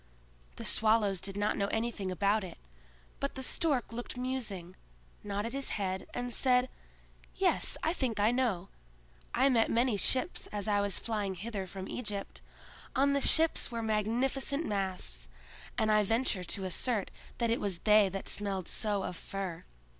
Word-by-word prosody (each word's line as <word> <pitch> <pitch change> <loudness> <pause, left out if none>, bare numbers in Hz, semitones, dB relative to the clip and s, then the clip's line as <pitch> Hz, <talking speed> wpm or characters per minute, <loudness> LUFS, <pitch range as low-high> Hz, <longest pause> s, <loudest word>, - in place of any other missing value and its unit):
The - - -7
Swallows 215 -4 +3
did 195 +1 -4
not 205 +1 +1
know 200 - +1
anything 220 -3 -2
about 200 +3 +1
it; 185 - -8 0.6
but 280 - -2
the 265 - -3
Stork 265 -4 +1
looked 240 +2 -5
musing, 225 -9 -3 0.5
nodded 205 +3 -3
his 275 0 -2
head, 190 -2 -2
and 245 0 -3
said: 250 0 +3 0.7
"Yes; - - +1
I 320 - +2
think 245 - -1
I 210 +3 +4
know; 230 -8 0 0.7
I 260 +3 +4
met 230 -4 +3
many 235 -2 +2
ships 260 - +3
as 205 -1 -4
I 205 -1 +3
was 200 -2 -1
flying 210 -4 -2
hither 200 0 -5
from 190 +1 -7
Egypt; 210 -5 -5 0.5
on 280 +1 +3
the 280 - +1
ships 320 +3 +4
were 230 -1 -3
magnificent 245 +7 +1
masts, 185 - -2 0.5
and 215 - +2
I 215 0 +5
venture 225 -2 +1
to 190 +3 0
assert 205 +3 -1 0.3
that 235 -1 +1
it 230 - 0
was 195 -4 -1
they 210 +1 +5
that 195 +1 -5
smelled 195 -3 -1
so 205 -2 0
of - - -4
fir. 190 -2 -5
215 Hz, 160 wpm, -31 LUFS, 195-245 Hz, 0.7 s, I